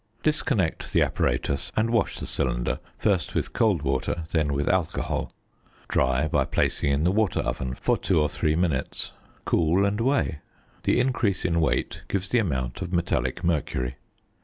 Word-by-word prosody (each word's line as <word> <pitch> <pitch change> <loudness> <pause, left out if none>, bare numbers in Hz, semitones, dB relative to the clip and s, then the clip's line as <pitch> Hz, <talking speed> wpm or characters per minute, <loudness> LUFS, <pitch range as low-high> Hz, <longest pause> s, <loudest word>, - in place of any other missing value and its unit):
Disconnect 135 - 0
the - - +5
apparatus, 60 +3 -1
and 110 +1 +1
wash 115 -2 +1
the - - -5
cylinder, - - -1 0.2
first - - 0
with - - -1
cold 100 -10 +2
water, 70 +4 -1
then 75 -3 +1
with 70 +1 -1
alcohol. 90 -3 0 0.6
Dry 65 +3 +2
by 70 -3 +2
placing 70 - +1
in 70 +2 +1
the 90 - +3
water 105 -2 +1
oven 65 +1 -3
for - - +1
two 95 -4 +2
or 75 - +3
three 75 +1 0
minutes. 80 -6 -1 0.3
Cool 85 +4 +3
and 105 +2 0
weigh: 130 - +1 0.5
the - - +3
increase 115 -7 +1
in 85 -1 +2
weight 80 - 0
gives 95 -1 -2
the 125 - +3
amount 65 - -2
of 85 - -4
metallic 85 -5 0
mercury. 70 -6 -1
80 Hz, 160 wpm, -26 LUFS, 70-100 Hz, 0.6 s, the